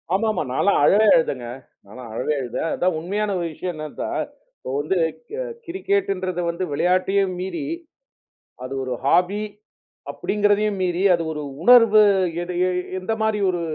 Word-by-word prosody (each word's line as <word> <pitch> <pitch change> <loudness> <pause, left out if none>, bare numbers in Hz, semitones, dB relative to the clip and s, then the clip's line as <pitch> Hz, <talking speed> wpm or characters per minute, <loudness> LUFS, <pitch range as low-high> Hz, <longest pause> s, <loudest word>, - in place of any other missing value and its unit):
ஆமா, 220 +3 +1
ஆமா. 185 - -2
நான்லாம் 200 +10 +2
அழுதேங்க 160 - +4 0.4
நான் 105 +6 -13
அழவே 130 +6 -1
அழுதேன். 125 +6 -3
அதான் 180 -1 0
உண்மையான 205 +5 -2
ஒரு 170 - -2
விஷயம் 180 +3 -4
என்ன 155 0 -6 0.2
சார், - - -2 0.3
இப்ப - - -9
வந்து 155 +6 -1 0.3
கே 460 - -5 0.3
கிரிக்கெட்டுன்றது 195 - -1
வந்து 170 +2 -3
விளையாட்டையும் 185 +4 +1
மீறி, 190 - -4 1.0
அது 130 - -6
ஒரு 130 -1 -3
ஹாபி 180 +7 +2 0.7
அப்பிடிங்கிறதையும் 205 0 0
மீறி, 180 +1 0
அது 170 - -3
ஒரு 150 -1 -5 0.2
உணர்வு 230 -2 +7 0.4
எடு 180 0 -5
எ - - 0 0.3
எந்தமாரி 220 +2 -1
ஒரு 175 -2 -1
185 Hz, 140 wpm, -22 LUFS, 170-210 Hz, 1.0 s, உணர்வு